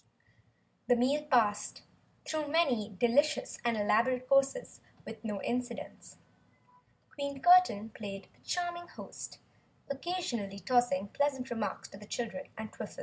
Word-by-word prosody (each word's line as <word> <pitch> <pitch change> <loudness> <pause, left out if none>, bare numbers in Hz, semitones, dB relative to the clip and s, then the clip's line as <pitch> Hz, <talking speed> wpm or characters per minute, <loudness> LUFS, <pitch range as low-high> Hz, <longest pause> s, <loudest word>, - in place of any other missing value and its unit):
The 245 - +6
meal 275 +5 +2
passed, 220 -6 +2 0.4
through 310 -1 -2
many 255 - +1
delicious 280 +6 +2
and 235 -2 +1
elaborate 245 +5 +2
courses, 275 - +2 0.2
with - - -9
no 210 -3 -3
incidents. 245 0 -4 1.0
Queen 280 -1 -4
Curtain 350 - +6
played 200 -2 -7
the - - -28
charming 345 -1 -2
host, - - -9 0.5
occasionally 270 - -3
tossing 205 -2 +2
pleasant 270 -1 0
remarks 225 -3 -3
to 195 - -11
the 210 - -12
children 245 +5 -4
and 220 0 -6
Twiffle. - - -7
250 Hz, 125 wpm, -32 LUFS, 215-285 Hz, 1.0 s, The